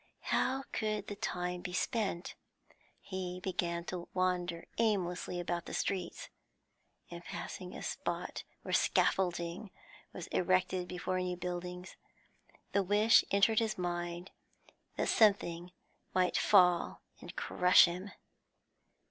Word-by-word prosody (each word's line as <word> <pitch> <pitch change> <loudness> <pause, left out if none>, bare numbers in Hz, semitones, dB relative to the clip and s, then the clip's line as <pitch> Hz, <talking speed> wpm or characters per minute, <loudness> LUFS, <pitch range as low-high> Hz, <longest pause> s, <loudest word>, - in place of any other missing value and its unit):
How 265 +1 +1
could 215 -2 -1
the 205 - -4
time 180 -2 -3
be 180 - -6
spent? 195 -4 -1 0.7
He 180 -1 -5
began 175 -2 -2
to 180 -2 -5
wander 180 -2 0
aimlessly 180 -5 0
about 175 -1 -3
the - - -4
streets. 190 -2 -3 0.8
In - - -8
passing - - -7
a - - -7
spot - - -3 0.2
where - - -4
scaffolding 175 +1 +1 0.4
was 175 - -7
erected 185 0 +1
before 180 +1 -2
new 180 -1 -2
buildings, 180 +1 -5 0.7
the 200 - +3
wish 205 +4 +5
entered 200 +2 +4
his 220 -2 -1
mind 175 0 -3 0.6
that - - 0
something 180 -5 +3 0.4
might 185 -1 +2
fall 180 -4 +4 0.2
and - - -10
crush 180 0 +6
him. 180 +3 -4
180 Hz, 115 wpm, -33 LUFS, 175-195 Hz, 0.8 s, crush